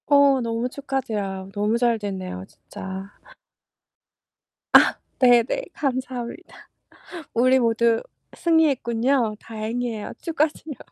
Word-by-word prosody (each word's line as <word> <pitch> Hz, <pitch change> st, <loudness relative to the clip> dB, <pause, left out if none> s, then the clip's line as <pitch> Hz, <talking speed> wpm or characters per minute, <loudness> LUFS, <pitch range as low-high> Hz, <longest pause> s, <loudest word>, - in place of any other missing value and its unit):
어 280 Hz, -2 st, +5 dB
너무 230 Hz, +1 st, -1 dB
축하드려요. 220 Hz, -9 st, -4 dB
너무 210 Hz, +2 st, +1 dB
잘 235 Hz, -1 st, +2 dB
됐네요 190 Hz, -, -5 dB
진짜. 190 Hz, +1 st, -9 dB, 1.6 s
아 -, -, +7 dB, 0.2 s
네네. 245 Hz, -, +4 dB
감사합니다. 260 Hz, +2 st, -4 dB, 0.7 s
우리 255 Hz, +3 st, +4 dB
모두 230 Hz, -1 st, +2 dB, 0.3 s
승리했군요. 260 Hz, -7 st, +2 dB
다행이에요. 225 Hz, 0 st, -4 dB
축하드려요. 310 Hz, -3 st, -2 dB
235 Hz, 235 characters per minute, -23 LUFS, 220-270 Hz, 1.6 s, 아